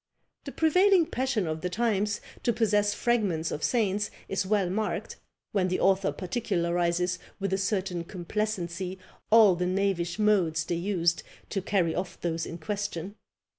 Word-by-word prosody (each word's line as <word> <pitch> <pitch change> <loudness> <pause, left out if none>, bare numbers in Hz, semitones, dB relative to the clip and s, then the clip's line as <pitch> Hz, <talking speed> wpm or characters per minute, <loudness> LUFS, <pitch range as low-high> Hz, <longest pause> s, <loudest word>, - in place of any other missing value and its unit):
The - - -5
prevailing 365 +2 +4
passion 260 - -1
of 160 0 -3
the 180 - -2
times 210 +1 0 0.2
to 235 - +2
possess 210 -2 +2
fragments 200 -10 0
of 150 - -4
saints 205 -4 +1 0.2
is 195 -1 -1
well 200 -2 +2
marked, 210 +4 -2 0.3
when 190 -3 +1
the 185 - -1
author 195 0 +3
particularises 180 -3 -1 0.2
with 195 -1 -1
a - - +2
certain 185 -3 -1
complacency 185 -1 -3 0.3
all 220 -3 +7
the 180 +1 -1
knavish 185 -2 0
modes 185 -7 +2
they - - -2
used 170 -1 +1 0.3
to 195 - -1
carry 180 -4 +1
off 180 +1 -4
those 165 -1 -2
in 165 - -6
question. 200 0 -4
190 Hz, 150 wpm, -28 LUFS, 175-210 Hz, 0.3 s, all